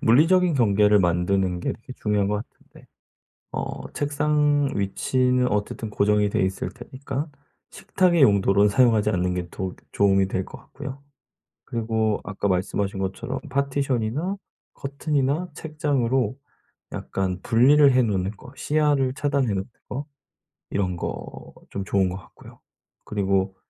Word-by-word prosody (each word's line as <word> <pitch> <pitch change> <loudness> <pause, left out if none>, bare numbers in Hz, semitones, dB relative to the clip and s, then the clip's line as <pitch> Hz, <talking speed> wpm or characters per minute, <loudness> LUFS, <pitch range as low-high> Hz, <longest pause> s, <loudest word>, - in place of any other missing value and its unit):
물리적인 165 +8 +4
경계를 105 -3 +4
만드는 90 +1 +1
게 - - -1
되게 125 - -11
중요한 105 -2 +1
것 105 - 0
같은데 - - -21 0.7
어 - - -4
책상 145 0 +1
위치는 125 +6 +1
어쨌든 105 +1 -2
고정이 105 0 +2
돼있을 95 -1 -1
테니까 135 +4 -6 0.4
식탁의 175 -4 +2
용도로 100 -2 +5
사용하지 110 -2 +3
않는 90 -2 0
게 90 -1 -3
도 95 0 -5 0.2
도움 95 -1 +3
이 95 - +3
될 95 -1 -2
것 - - -11
같고요. 140 -1 -9 0.6
그리고 110 -2 -1
아까 100 0 -2
말씀하신 95 +1 -1
것처럼 95 0 -3
파티션이나 140 - -1 0.4
커튼이나 140 +3 -1
책장으로 135 -7 0 0.6
약간 95 -1 -3
분리를 135 +5 +5
해 130 0 +4
놓는 100 -3 0
거 125 +5 -14
시야를 145 -4 +1
차단해 140 -3 0
놓는 95 0 -1 0.2
거 140 +3 -4 0.6
이런 90 -3 -1
거 - - -6 0.2
좀 100 -1 -5
좋은 95 -2 +2
것 90 - -5
같고요. 95 - -15 0.5
그리고 95 -2 0
110 Hz, 295 characters per minute, -24 LUFS, 100-140 Hz, 0.7 s, 용도로